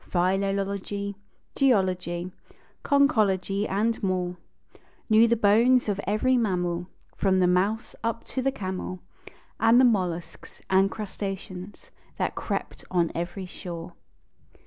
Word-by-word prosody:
Philology, 195 +2 -1 0.4
geology, 185 -8 +1 0.5
conchology 210 -8 +2
and 220 +4 0
more; 180 -2 -1 0.8
Knew 220 +2 +7
the 235 - +3
bones 230 +4 +4
of 200 -1 -1
every 215 +6 +2
mammal, 180 -5 -1 0.3
From 190 -1 +2
the 185 - +4
mouse 195 +6 +1
up 230 0 -2
to 260 - -3
the 270 +1 +1
camel, 185 -4 -5 0.6
And 230 +2 +6
the 260 - +7
mollusks 180 -7 -1
and 190 +1 +4
crustaceans 195 -2 -6 0.3
that - - -1
crept - - -4
on 175 -2 +1
every 175 +3 -4
shore. 175 -2 -8
195 Hz, 115 wpm, -26 LUFS, 180-220 Hz, 0.8 s, Knew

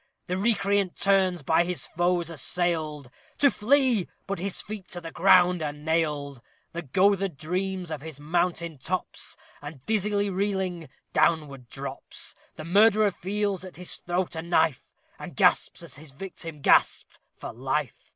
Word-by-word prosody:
The 180 - -2
recreant 200 -2 +1
turns, 190 -4 +2
by 160 +4 +3
his 175 -4 -2
foes 175 -1 0
assailed, 155 -4 -1 0.3
To 280 -1 +5
flee! 250 -3 +3 0.2
but 200 -3 -3
his 195 +1 -2
feet 210 -3 -6
to 175 - -4
the 165 -1 -8
ground 180 -1 +5
are 150 -2 -1
nailed. 150 -3 -1 0.3
The 170 - -3
goatherd 190 +3 +2
dreams 180 +2 -3
of 150 -3 -4
his 155 -2 -8
mountain 170 0 -1
tops, 180 +7 -4 0.2
And, 145 -2 -10
dizzily 205 -1 +1
reeling, 185 -5 -2 0.2
downward 140 -7 +1
drops. - - -6 0.2
The 155 - -8
murderer 210 +3 +5
feels 200 0 -2
at 185 - -10
his 180 0 -3
throat 175 0 -2
a 160 - -3
knife, 165 -4 0 0.2
And - - -8
gasps, - - +3
as - - -9
his 155 +1 -11
victim 165 0 -7
gasped, - - +3 0.2
for - - -7
life! 130 +2 -3
175 Hz, 150 wpm, -26 LUFS, 155-195 Hz, 0.3 s, To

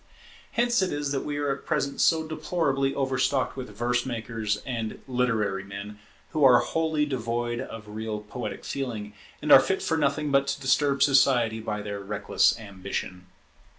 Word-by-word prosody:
Hence 240 -1 +2
it 190 - 0
is 145 -1 -2
that 135 - -1
we 145 -1 -3
are 145 -1 0
at - - -14
present 140 0 0
so 160 -1 +3
deplorably 155 -4 0
over 135 -2 -1
stocked 130 0 +1
with 130 -3 -6
verse 120 +3 0
makers 115 -3 -3
and 115 -4 -4
literary 115 -6 0
men, 100 +1 -8 0.3
who 155 - 0
are 125 -2 +8
wholly 160 0 0
devoid 120 -3 -2
of 110 -2 -8
real 110 0 -4
poetic 105 +4 -6
feeling, 115 -7 -4 0.3
and 150 - 0
are - - +11
fit 190 +8 -1
for 160 - 0
nothing 150 0 0
but 140 0 +3
to 140 - -2
disturb 140 +1 +2
society 125 -5 +4
by 105 -1 -4
their 100 -1 -4
reckless 100 +3 +1
ambition. 95 -3 -6
125 Hz, 170 wpm, -26 LUFS, 110-140 Hz, 0.3 s, are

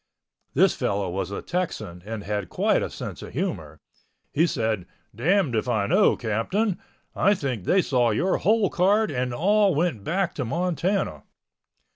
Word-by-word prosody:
This - - +5
fellow 100 -2 -1
was 95 0 -3
a 100 - -5
Texan 175 - -3
and 110 0 -6
had 105 -1 -3
quite - - +2
a - - -2
sense - - -7
of - - -9
humor. - - -3 0.5
He 165 +4 +3
said, 110 - -1 0.3
"Damned 160 - +1
if 115 +2 0
I 110 -4 +1
know, 190 - +4
Captain. 170 - -1 0.4
I 200 +1 +3
think 125 - -3
they 190 -1 +3
saw 125 -3 +2
your 175 - +1
hole 215 -2 +2
card 205 +4 +2
and 125 -2 -1
all 200 - +3
went 155 - 0
back 180 - -1
to 140 - -3
Montana." 180 - -1
145 Hz, 160 wpm, -25 LUFS, -, 0.5 s, This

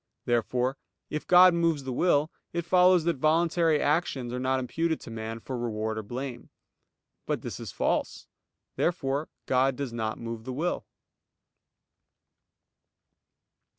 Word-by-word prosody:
Therefore, 125 +2 0 0.3
if 150 - -4
God 180 0 +8
moves 165 -4 +1
the 130 -1 -4
will, 155 +1 +2 0.2
it 170 -1 -2
follows 180 -1 +5
that 170 -2 0
voluntary 165 +1 +3
actions 145 -6 0
are 125 - -2
not 130 +1 +1
imputed 160 +6 -1
to 115 - -9
man 115 0 -5
for 130 +3 -6
reward 110 -2 -2
or - - -3
blame. 120 +3 -6 0.8
But - - -2
this - - -5
is - - -6
false. - - -1 0.5
Therefore 145 -3 0 0.2
God 130 +1 +2
does 135 -3 -4
not 110 -2 -2
move 115 -1 -6
the 130 +2 -5
will. 165 +7 -2
135 Hz, 135 wpm, -28 LUFS, 120-165 Hz, 0.8 s, God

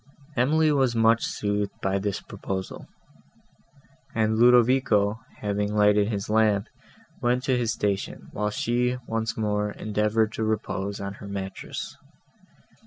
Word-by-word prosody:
Emily 155 +5 +3
was 135 -4 +2
much 115 0 +4
soothed 105 -1 -2
by 95 +1 0
this 100 -1 -2
proposal; 95 -1 -6 1.3
and 110 -1 +2
Ludovico, 120 -3 +4 0.2
having 105 0 -1
lighted 105 -1 +4
his 100 -3 -3
lamp, 105 -2 +2 0.5
went 125 +1 +1
to 130 -2 +2
his 120 -2 0
station, 100 -3 -2
while 105 0 -1
she, 120 +3 0
once 115 -1 -2
more, 105 -1 0
endeavoured 105 +1 0
to 110 - -2
repose 100 -2 -2
on 100 0 -4
her 100 0 -10
mattress. 95 -1 -6
105 Hz, 125 wpm, -26 LUFS, 100-115 Hz, 1.3 s, much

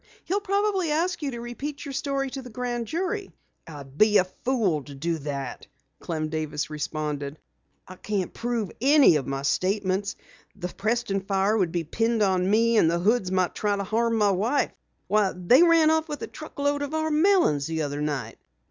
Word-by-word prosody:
He'll 390 +4 0
probably 400 -3 0
ask 335 +4 0
you 290 - -1
to 240 -3 -6
repeat 270 +6 -6
your 280 - -6
story 275 -1 -2
to 270 - -5
the 250 - -10
Grand 240 0 -3
Jury." 380 - -3 0.4
"I'd 145 -3 -11
be 215 -1 +6
a - - +5
fool 190 - -1
to 145 - -10
do 165 +4 -2
that," 140 -3 -5 0.3
Clem 155 -2 -3
Davis 155 -1 -3
responded. 150 -1 -4 0.5
"I 185 - -11
can't 200 -3 -3
prove 230 -6 -2
any 275 - +6
of 135 - -4
my 135 0 -3
statements. 190 +5 0 0.4
The 180 -3 -5
Preston 215 +1 -1
fire 195 +2 +1
would 185 -6 +1
be 170 -1 -1
pinned 225 +6 0
on 185 -1 +2
me, 230 +2 +3
and 165 - +5
the 170 - +1
Hoods 195 +1 +1
might 185 -1 +1
try 205 -1 0
to 200 - -2
harm 230 +3 0
my 210 -2 +3
wife. 235 +9 +1 0.3
Why, 205 -1 +2
they 180 - +5
ran 330 -2 +5
off 320 0 +1
with 295 - -5
a - - -4
truck 310 - -11
load 285 0 0
of 285 +2 -3
our 315 0 0
melons 310 - +3
the 160 -1 -2
other 145 0 -3
night." 140 -7 -3
210 Hz, 190 wpm, -26 LUFS, 165-275 Hz, 0.5 s, be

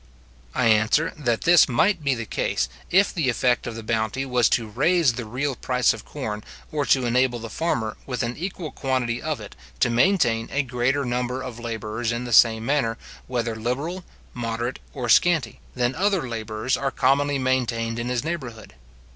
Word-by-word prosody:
I - - +2
answer, 110 +8 +3
that 120 -6 -1
this 170 -3 +6
might 165 - +2
be 140 -2 +2
the 115 -1 -5
case, - - -1 0.2
if 195 +3 +4
the 160 -8 0
effect 125 +1 +1
of 115 - -5
the 115 - -7
bounty 110 +4 -1
was 125 -4 +2
to 115 - +1
raise 150 - +2
the 120 0 -5
real 130 +4 -2
price 125 -1 +2
of 110 - -10
corn, 105 -7 -5 0.3
or 145 -2 -1
to 130 -2 +3
enable 125 +1 +2
the 115 -1 -8
farmer, 115 -9 -1
with 125 -3 -2
an 120 +1 -3
equal 175 -2 -5
quantity 125 -3 -1
of 155 -2 -2
it, - - -10 0.2
to 120 - +3
maintain 120 - +2
a 145 - +1
greater 125 +2 0
number 125 +1 -2
of 120 -3 -7
labourers 110 0 -3
in 120 +1 -2
the 120 -2 -4
same 110 0 +5
manner, 135 -5 +1 0.3
whether 120 -2 -2
liberal, 140 +11 -3 0.3
moderate, 120 +1 -3 0.2
or 125 -3 -3
scanty, 155 0 +3 0.2
than 125 0 +1
other 190 -4 +1
labourers 110 +1 -2
are 140 - -1
commonly 140 +2 +2
maintained 120 -3 0
in 120 +1 -3
his 125 0 -1
neighbourhood. 125 - -5
125 Hz, 180 wpm, -24 LUFS, 115-140 Hz, 0.3 s, this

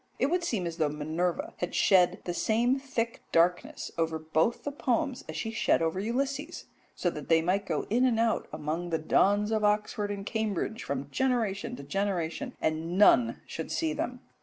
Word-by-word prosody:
It 270 +4 +1
would 360 0 +1
seem 220 - -1
as 170 -1 -4
though 155 -3 +2
Minerva 155 +4 -2
had 175 - -3
shed 185 -1 +4
the 175 - -3
same 240 +8 +2
thick 235 -4 -3
darkness 175 +1 +1
over 165 -1 +1
both 160 +7 0
the 290 - -3
poems 260 -1 -1
as 155 - -5
she 225 +8 -3
shed 225 - +2
over 165 +2 0
Ulysses, 275 - -2 0.3
so 175 - 0
that 150 -3 -8
they 165 -1 +6
might 195 +3 0
go 155 -3 -1
in 245 +3 +3
and 235 -3 +2
out 230 -1 +1
among 155 +3 -3
the 165 - +1
dons 205 +6 +2
of 215 -1 +1
Oxford 210 0 +1
and 200 -1 -4
Cambridge 220 0 -2
from 140 0 -4
generation 235 - 0
to 140 - -9
generation, 195 - -2
and 160 +3 -1
none 120 - +5
should 160 - -6
see 160 -1 0
them. 250 +9 -4
195 Hz, 185 wpm, -29 LUFS, 160-230 Hz, 0.3 s, they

